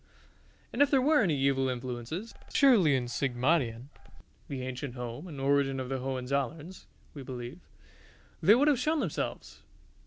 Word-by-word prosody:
And 245 - 0
if 285 - +6
there 275 - +4
were 295 +1 +4
any 165 -8 +1
evil 135 -1 +1
influences, 125 - -5 0.2
surely 215 - +5
at 125 -1 -3
Sigmaringen 125 -1 0 0.6
(the 130 -2 -5
ancient 130 0 -5
home 125 +6 -6
and 150 -5 -8
origin 135 0 +1
of 130 -1 -5
the 135 -1 -2
Hohenzollerns, 140 +6 -3 0.3
we 145 - -8
believe) 125 +3 -7 0.8
they 210 - +7
would 280 +5 +3
have 285 -5 +3
shown 310 +5 +1
themselves. - - -4
140 Hz, 150 wpm, -30 LUFS, 125-185 Hz, 0.8 s, they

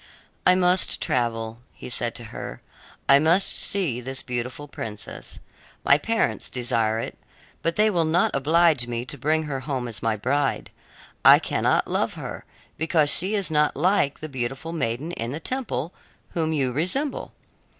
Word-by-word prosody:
"I 180 - +7
must 180 0 +2
travel," 115 -2 -1
he - - -12
had 125 - -5
said 120 -1 -2
to 120 - -1
her; - - -6 0.5
"I 140 +1 +7
must 165 +6 +4
see 160 -12 0
this 130 +2 -5
beautiful 125 +4 -4
princess. 105 -6 -7 0.5
My 140 - +6
parents 225 +7 0
desire 115 -3 0
it, 115 - -5 0.4
but 165 0 0
they 215 +1 +4
will 170 -4 +2
not 165 +3 +2
oblige 155 -2 +3
me 120 0 -3
to 135 - -3
bring 155 +4 +1
her 145 -3 -3
home 130 -3 -3
as 115 - -7
my 115 -1 +1
bride. 135 +5 -1 0.5
I - - +10
cannot - - +1
love - - -1
her, - - -7 0.3
because 155 -2 +3
she 195 +5 +2
is 195 -5 -1
not 150 -1 +2
like 165 -3 +2
the 155 - -4
beautiful 135 +4 -4
maiden 140 +1 -2
in 115 -9 -4
the 145 +5 -4
temple, 180 - -3 0.4
whom 160 -2 0
you 135 -5 +1
resemble. 185 - -2
145 Hz, 165 wpm, -24 LUFS, 125-170 Hz, 0.5 s, I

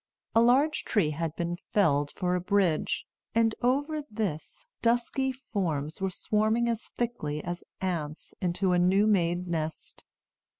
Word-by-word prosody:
A 225 - +6
large 270 +6 +4
tree 180 -9 +1
had 160 +1 -3
been 175 0 -2
felled 145 -8 +2
for 180 +2 -1
a 180 - +1
bridge, 185 -4 +1 0.3
and 225 -1 +4
over 285 +5 +1
this 205 - -4 0.2
dusky 240 +3 +1
forms 175 - -3
were 190 - +1
swarming 215 +5 +1
as 230 -1 -2
thickly 155 -12 -2
as 175 0 -4 0.2
ants 165 -5 -3
into 180 +1 +1
a 180 - +3
new 190 +4 +4
made 180 -4 +2
nest. 160 -2 -4
190 Hz, 140 wpm, -29 LUFS, 170-230 Hz, 0.3 s, A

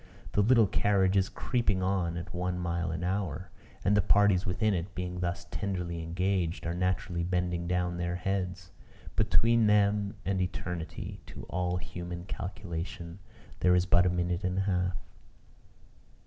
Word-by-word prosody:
The 105 - +3
little 115 +1 +6
carriage 95 -1 +2
is 95 -1 +3
creeping 105 -7 0
on 90 -3 0
at 85 - -6
one 90 0 -1
mile 85 -1 -1
an 80 +1 -3
hour; 95 -3 -2 0.3
and 100 +2 +4
the 105 - +5
parties 100 -1 +4
within 95 +4 +1
it, 90 +1 -3
being 90 0 -3
thus 90 +1 -2
tenderly 90 -4 -2
engaged, 90 +1 -1
are 85 - -1
naturally 90 0 -1
bending 90 -1 -1
down 90 0 0
their 85 0 -1
heads. 90 -1 -2 0.4
Between 115 +1 +4
them 105 0 +3
and 95 -1 +1
eternity, 90 -2 -4
to - - -9
all 90 0 0
human 85 0 -6
calculation, 90 -3 -5 0.4
there 90 0 +5
is 90 0 +3
but 90 0 +5
a - - +4
minute 90 +1 -1
and 90 0 -1
a - - +3
half. 90 -2 0
90 Hz, 155 wpm, -30 LUFS, 85-100 Hz, 0.4 s, little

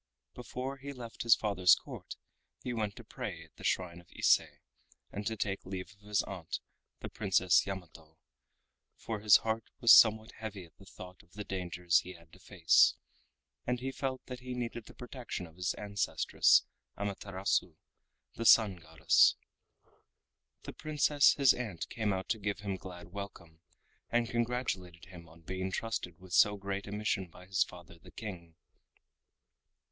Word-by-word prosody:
Before 125 +2 -6
he 140 +1 -7
left 120 -3 -8
his 115 -2 +6
father's 95 -4 +4
Court - - -9 0.5
he 125 - -3
went 105 -3 -2
to 120 - -11
pray 105 -7 -6
at 80 - -22
the - - -12
shrine 85 -2 -1
of 85 - -26
Ise - - +5 0.7
and 100 0 -4
to 110 0 -2
take 100 -1 -2
leave 95 +2 -6
of 105 0 -21
his 105 -1 +1
aunt 90 -5 -6 0.4
the - - -5
Princess - - +3
Yamato, 85 -4 -8 0.8
for 110 -2 -5
his 105 0 +7
heart 110 0 -1
was 120 - +8
somewhat 110 0 +6
heavy 105 -4 -6
at 80 - -23
the 95 - -16
thought 90 -1 -11
of 85 - -28
the 105 - -6
dangers 90 -3 0
he 90 - -8
had 85 -2 -18
to 95 - -16
face, 85 -3 +4 0.7
and 125 0 0
he 135 +2 -3
felt 130 -1 -4
that 125 -1 -7
he 125 0 -6
needed 120 -2 -4
the - - -14
protection 125 -6 -6
of 80 -1 -16
his 90 0 -2
ancestress, 100 -1 +2 0.3
Amaterasu, 100 -3 -2 0.6
the 115 - -5
Sun 105 -4 +6
Goddess. 80 -1 +4 1.3
The - - -7
Princess 150 -2 +3
his 140 -3 +5
aunt 105 -9 -5
came 110 -3 -1
out 95 -1 -3
to 110 - 0
give 100 -1 -3
him 100 -2 -3
glad 90 -2 -10
welcome, 85 -5 -9 0.5
and 120 0 +1
congratulated 115 -8 -2
him 85 -3 -13
on 85 +1 -17
being 95 +3 -4
trusted 95 -6 -4
with 90 -1 -12
so 105 0 +5
great 100 0 -4
a - - -7
mission 105 -2 -1
by 90 +2 -15
his 95 -1 +2
father 85 -1 -13
the - - -16
King. 85 -7 -8
100 Hz, 165 wpm, -32 LUFS, 90-115 Hz, 1.3 s, was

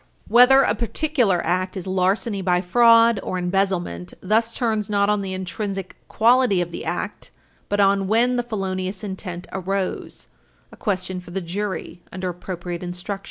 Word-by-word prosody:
Whether 250 +3 +7
a - - +2
particular 235 - 0
act 185 +2 -1
is 185 - -5
larceny 190 +3 0
by 180 -1 +2
fraud 230 +3 +5
or 185 - -3
embezzlement 180 - -1
thus 220 +4 +1
turns 220 -4 -1
not 200 0 +2
on 210 -1 +1
the 190 -1 -4
intrinsic 190 +1 -4
quality 235 -3 +3
of 175 -1 -2
the - - -6
act, - - -4 0.4
but 205 - 0
on 195 -1 +3
when 235 +4 +3
the 245 - +1
felonious 190 -4 -4
intent 190 -3 -6
arose 190 0 -3 0.4
a - - -12
question 185 -3 -2
for 180 - -13
the 185 +2 -3
jury 185 -1 -4
under 185 0 -4
appropriate 175 -1 -6
instructions. 180 +3 -5
195 Hz, 160 wpm, -22 LUFS, 180-215 Hz, 0.4 s, Whether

